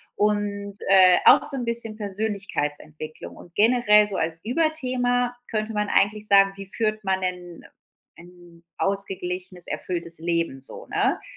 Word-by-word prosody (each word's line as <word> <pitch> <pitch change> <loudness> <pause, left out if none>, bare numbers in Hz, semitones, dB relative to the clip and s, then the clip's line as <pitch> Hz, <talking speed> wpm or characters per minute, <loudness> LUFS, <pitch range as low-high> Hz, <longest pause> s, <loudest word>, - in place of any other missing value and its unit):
und, 205 -1 -1 0.2
äh, 185 -2 +7
auch - - +7
so 290 -2 -2
'n 250 - -3
bisschen 235 -2 0
Persönlichkeitsentwicklung 190 -7 -5
und 175 - -15
generell 210 -2 +4
so 195 - -4
als 165 0 -2
Überthema 250 -3 0
könnte 215 0 -3
man 210 0 -1
eigentlich 210 +1 +2
sagen, 195 -1 +5
wie 195 - -7
führt 215 +1 -1
man 190 0 0
'nen 180 -2 -5 0.5
ein 175 -1 -16 0.2
ausgeglichenes 185 -2 -3
erfülltes 170 -2 -3
Leben 165 -5 -2
so, - - -10
ne? - - 0
200 Hz, 135 wpm, -24 LUFS, 175-215 Hz, 0.5 s, äh